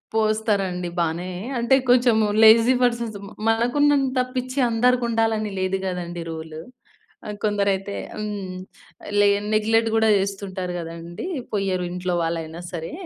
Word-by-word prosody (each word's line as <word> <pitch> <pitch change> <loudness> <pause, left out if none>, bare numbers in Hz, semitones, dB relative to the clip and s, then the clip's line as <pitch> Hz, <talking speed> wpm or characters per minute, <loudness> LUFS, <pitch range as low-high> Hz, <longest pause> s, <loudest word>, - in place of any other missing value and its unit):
పోస్తారండి 205 -5 0
బానే 170 +2 -1 0.3
అంటే 235 +3 +4
కొంచెం 245 -2 +5 0.3
లేజీ 225 +3 +7
పర్సన్స్ 235 -3 0
మ - - -10 0.2
మనకున్నంత 265 +3 +2 0.2
పిచ్చి 255 +2 -2
అందరికుండాలని 225 -3 +1
లేదు 185 +1 0
గదండీ 175 -2 -4
రూల్. 160 -1 -7 0.7
ఆహ్, 210 - -5
కొందరైతే 200 -1 0 0.2
హ్మ్. 205 -3 -5 0.6
లె 205 - +6 0.3
నెగ్లెక్ట్ 225 +1 +2
గూడా 220 0 +3
జేస్తుంటారు 195 -2 -3
గదండీ! 170 - -7 0.3
పోయరు 190 -3 -1
ఇంట్లో 180 0 -2
వాళ్లయినా 165 0 -4
సరే, 165 -2 -5
205 Hz, 115 wpm, -23 LUFS, 180-225 Hz, 0.7 s, లేజీ